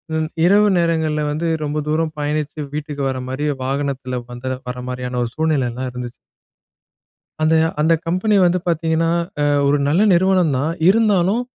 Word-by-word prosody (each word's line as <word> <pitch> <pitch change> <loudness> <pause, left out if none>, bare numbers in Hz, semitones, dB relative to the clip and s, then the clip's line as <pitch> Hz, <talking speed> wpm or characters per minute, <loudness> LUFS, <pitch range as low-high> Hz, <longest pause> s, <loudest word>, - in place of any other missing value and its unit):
ம் 155 0 -1 0.2
இரவு 205 +3 +5
நேரங்கள்ல 160 -3 +1
வந்து 155 +3 -2 0.2
ரொம்ப 150 0 -2
தூரம் 155 0 -1
பயணிச்சு 150 +1 -2
வீட்டுக்கு 150 -1 -4
வரமாரியே 130 +3 -2
வாகனத்தில 135 -2 -2
வந்த 130 +2 -4
வர 125 - -5
மாரியான 125 0 -4
ஒரு 120 - -3
சூழ்நிலைலாம் 130 -5 -1
இருந்துச்சு. 125 -1 -6 1.3
அந்த 155 +1 +3 0.3
அந்த 160 +2 +4
கம்பெனி 185 +5 +1
வந்து 175 +1 +2
பார்த்தீங்கன்னா, 165 0 +1 0.3
அ - - +2 0.2
ஒரு 145 +1 +3
நல்ல 165 +7 +2
நிறுவனம் 180 -3 +3
தான். 150 +5 -1 0.2
இருந்தாலும் 205 0 +3
155 Hz, 140 wpm, -19 LUFS, 130-170 Hz, 1.3 s, இரவு